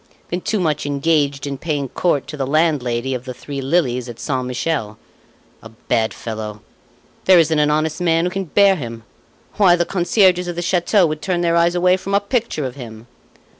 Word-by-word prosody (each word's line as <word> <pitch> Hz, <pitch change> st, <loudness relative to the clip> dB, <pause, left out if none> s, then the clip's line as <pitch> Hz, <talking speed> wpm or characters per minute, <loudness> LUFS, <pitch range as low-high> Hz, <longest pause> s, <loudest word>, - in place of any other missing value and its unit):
been 175 Hz, +1 st, -3 dB
too 215 Hz, -, -1 dB
much 155 Hz, -4 st, -1 dB
engaged 145 Hz, -1 st, 0 dB
in 140 Hz, -1 st, -5 dB
paying 145 Hz, -4 st, -2 dB
court 145 Hz, +1 st, 0 dB
to 150 Hz, -, -8 dB
the 135 Hz, -3 st, -3 dB
landlady 135 Hz, -5 st, 0 dB
of 125 Hz, -1 st, -5 dB
the 130 Hz, -1 st, -7 dB
Three 140 Hz, +2 st, -6 dB
Lilies 130 Hz, -4 st, 0 dB
at 120 Hz, -, -9 dB
Saint 130 Hz, -3 st, -2 dB
Michel. 125 Hz, -4 st, -2 dB, 0.6 s
A 115 Hz, -, -11 dB
bad 115 Hz, 0 st, -1 dB
fellow! 110 Hz, -2 st, -7 dB, 0.6 s
There 185 Hz, -1 st, +7 dB
isn't 160 Hz, -2 st, +3 dB
an 150 Hz, 0 st, +3 dB
honest 155 Hz, +2 st, 0 dB
man 165 Hz, -1 st, +2 dB
who 180 Hz, -, -1 dB
can 195 Hz, +1 st, -3 dB
bear 195 Hz, +4 st, +4 dB
him. 115 Hz, -7 st, -7 dB, 0.5 s
Why, 190 Hz, -4 st, +6 dB
the 175 Hz, 0 st, 0 dB
concierges 180 Hz, 0 st, +2 dB
of 175 Hz, -, -4 dB
the 175 Hz, -, -3 dB
chateau 180 Hz, +2 st, +2 dB
would 155 Hz, -1 st, -3 dB
turn 180 Hz, -2 st, -1 dB
their 170 Hz, -1 st, +1 dB
eyes 170 Hz, +1 st, +3 dB
away 180 Hz, +1 st, +3 dB
from 195 Hz, +1 st, -3 dB
a -, -, +5 dB
picture 205 Hz, -, -2 dB
of 130 Hz, -, -4 dB
him!" 115 Hz, -4 st, -10 dB
155 Hz, 200 wpm, -19 LUFS, 130-175 Hz, 0.6 s, There